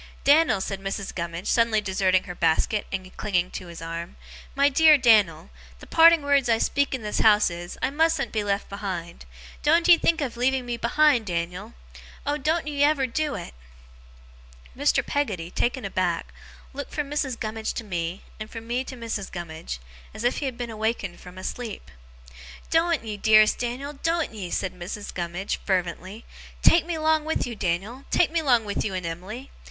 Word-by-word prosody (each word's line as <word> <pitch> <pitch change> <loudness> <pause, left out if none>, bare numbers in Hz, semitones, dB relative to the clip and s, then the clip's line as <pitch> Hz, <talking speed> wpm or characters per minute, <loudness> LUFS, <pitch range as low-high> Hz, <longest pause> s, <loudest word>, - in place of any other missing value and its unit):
'Dan'l,' 295 -6 +5
said 195 0 -4
Mrs. 195 0 -4
Gummidge, 170 +1 -5
suddenly 230 -2 +3
deserting 190 -2 +1
her 180 - -7
basket, 170 +5 +1
and 185 -1 -5
clinging 180 -3 0
to 180 - -7
his 170 -1 -9
arm 165 +1 -6 0.4
'my 280 +1 +4
dear 305 +2 +6
Dan'l, 210 - +3 0.3
the - - -12
parting 330 -1 +6
words 280 -3 +2
I 225 - +4
speak 280 +4 +1
in 250 - -7
this 210 - -2
house 210 -3 +5
is, 175 +1 -7
I 260 - +1
mustn't 320 -1 +1
be 215 -2 -1
left 200 0 -1
behind. 185 - -6 0.4
Doen't 335 +3 +3
ye 345 -2 +8
think 335 0 +2
of 265 -6 -3
leaving 255 +1 +1
me 240 -1 -2
behind, 240 0 +3
Dan'l! 180 +5 -4 0.5
Oh, 295 +1 -1
doen't 315 +4 0
ye 290 -1 0
ever 290 -2 +3
do 295 +4 -2
it!' - - -7 1.2
Mr. - - +2
Peggotty, 195 -13 -2
taken 245 +2 -1
aback, 180 -3 -1 0.4
looked 285 +1 -6
from 295 -2 -1
Mrs. 275 -4 -2
Gummidge 220 0 -3
to 235 - -4
me, 175 -2 -4 0.2
and 215 0 -6
from 225 -1 -8
me 245 +2 -1
to 260 - -7
Mrs. 225 -4 -4
Gummidge, 160 - -6 0.4
as 215 - -6
if 245 - +1
he 290 - -3
had 255 -3 -3
been 240 -2 -4
awakened 220 -4 -2
from 180 0 -12
a 185 - -8
sleep. 220 - -6 0.8
'Doen't 330 -2 +2
ye, 215 -2 -4
dearest 215 +1 +5
Dan'l, 250 +4 -3
doen't 330 -5 0
ye!' 195 -5 -6
cried 185 - -2
Mrs. 200 +4 -6
Gummidge, 175 +2 -3
fervently. 185 +3 -2 0.4
'Take 335 0 +5
me 340 -2 -2
'long 315 0 +2
with 315 +1 -1
you, 240 -2 -5
Dan'l, 205 +8 -3
take 335 - +3
me 335 0 +1
'long 245 -7 +3
with 205 - -2
you 195 -3 -3
and 180 -2 -3
Em'ly! 190 +11 -6
220 Hz, 185 wpm, -25 LUFS, 185-280 Hz, 1.2 s, ye